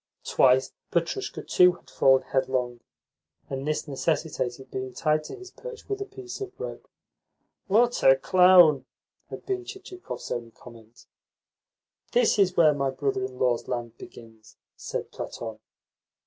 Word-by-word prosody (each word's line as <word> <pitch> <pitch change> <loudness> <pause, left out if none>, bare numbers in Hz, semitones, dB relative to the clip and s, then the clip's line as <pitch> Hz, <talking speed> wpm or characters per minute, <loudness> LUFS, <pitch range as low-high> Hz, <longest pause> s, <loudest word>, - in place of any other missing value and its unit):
Twice 130 0 +3 0.2
Petrushka, 170 - -2
too, 180 0 +5
had 175 - -18
fallen 135 -1 +4
headlong, 130 -2 -1 0.7
and 135 +1 -4
this 155 +1 -2
necessitated 135 -3 -2
being 130 -1 -5
tied 155 -1 +1
to - - -7
his 375 -1 -12
perch - - -10
with 405 0 -3
a - - -2
piece 385 -1 -9
of 390 0 -7
rope. 485 - -7 0.8
"What 235 +5 +3
a 135 - +8
clown!" 180 -2 +6 0.4
had - - -9
been 380 -2 -2
Chichikov's 370 -1 -9
only 120 -1 -3
comment. 115 0 -16 1.1
"This 485 - +3
is 185 -2 +3
where 155 -3 +6
my 140 -1 -1
brother 135 -1 -2
in 130 0 -6
law's 125 -2 0
land 120 -2 -4
begins," 110 -2 -14 0.2
said - - -5
Platon. - - -7
145 Hz, 140 wpm, -26 LUFS, 130-205 Hz, 1.1 s, a